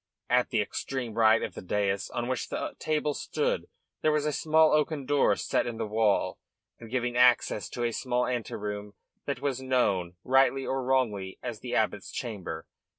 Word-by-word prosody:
At 125 0 +3
the 110 -3 +2
extreme 125 +1 -4
right 110 0 +4
of - - -4
the - - -7
dais 100 +1 -1
on 120 0 -3
which 130 -1 -2
the - - -3
table 150 -1 0
stood 485 - -2 0.3
there 155 - +3
was 150 -1 +1
a 150 - 0
small 160 +2 +4
oaken 150 -2 +1
door 145 +1 +3
set - - 0
in 120 -2 -4
the 110 - -2
wall 110 -1 +1 0.4
and 115 - -10
giving 125 0 -1
access 125 -5 +4
to 120 - -4
a 120 - +1
small 125 +1 0
ante 120 -2 -3
room 105 0 -5 0.3
that 140 -3 -2
was 135 -2 -1
known, 100 -9 +1
rightly 135 +1 +3
or 135 0 -1
wrongly, 110 -8 0
as - - -4
the - - -4
abbot's - - 0
chamber. 95 -8 -5
125 Hz, 185 wpm, -28 LUFS, 105-135 Hz, 0.4 s, right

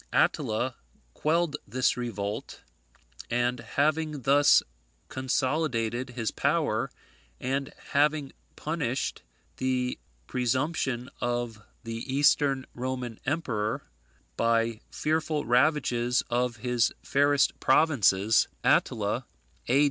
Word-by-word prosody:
Attila 120 +4 +1 0.4
quelled 160 -1 +1
this 125 +4 +1
revolt; 105 -4 -4 0.7
and 120 +1 +1
having 150 +1 0
thus 140 +3 +5 0.5
consolidated 130 -2 -1
his 115 -3 -1
power, 145 -6 0 0.5
and 135 +1 -2 0.2
having 145 -1 +2 0.2
punished 150 -5 -2 0.4
the 130 -1 -1 0.3
presumption 130 - -1
of 120 -2 -2 0.2
the 115 -1 -5
Eastern 140 -1 +3
Roman 125 -2 -4
emperor 120 -9 -1 0.5
by 115 -1 +1
fearful 155 -1 -1
ravages 125 -2 +2
of 120 0 +1
his 120 +1 +1
fairest 145 0 +2
provinces, 110 - +4 0.2
Attila, - - +1 0.4
A. 130 +3 +4
130 Hz, 85 wpm, -28 LUFS, 120-145 Hz, 0.7 s, thus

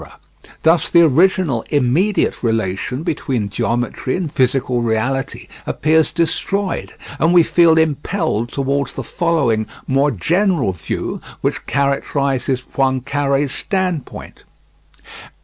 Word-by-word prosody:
Thus 165 +1 +3
the 170 - +6
original, 160 -4 +3
immediate 150 +9 +1
relation 115 +3 -1
between 130 - -2
geometry 120 +4 -2
and 175 -6 -4
physical 125 -1 +1
reality 125 +4 -2 0.2
appears 160 +1 +2
destroyed, 185 +3 -2 0.2
and 165 +3 +3
we 175 - +7
feel 165 -1 +4
impelled 155 - 0
toward 140 0 -1
the 135 - -7
following 135 -8 0 0.2
more 135 +2 +2
general 165 - +1
view, 80 -4 -5 0.2
which - - -2
characterizes 140 -2 0
Poincare's 140 +1 0
standpoint. 180 0 -3
140 Hz, 100 wpm, -18 LUFS, 125-165 Hz, 0.2 s, we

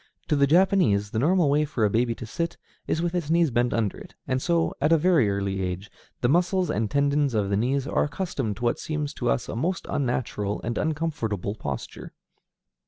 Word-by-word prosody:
To 150 - +3
the 140 -1 +4
Japanese, 155 - +3
the 110 - -1
normal 170 +4 +3
way 145 +2 +3
for 135 -7 0
a - - +3
baby 115 +1 +1
to 120 - -7
sit 170 +9 -3 0.3
is 165 - 0
with 175 0 -1
its 170 -4 -2
knees 165 -3 +3
bent 120 +1 +1
under 110 -4 -1
it, - - -13
and 130 -1 0
so, 170 +1 +1
at 150 +3 +3
a 165 - +6
very 160 - +3
early 100 -1 -1
age, 95 +3 -4 0.3
the 120 - +3
muscles 180 +5 +2
and 110 0 -1
tendons 140 -2 +1
of 100 -2 0
the - - +2
knees 130 +6 0
are - - +1
accustomed 145 - -3
to 120 - -8
what 120 - +1
seems 150 -1 -3
to 120 -3 -2
us 115 - 0
a - - -5
most 170 +10 -1
unnatural 120 -6 -1
and 120 0 -2
uncomfortable 145 - -2
posture. 70 - -6
135 Hz, 210 wpm, -25 LUFS, 110-160 Hz, 0.3 s, a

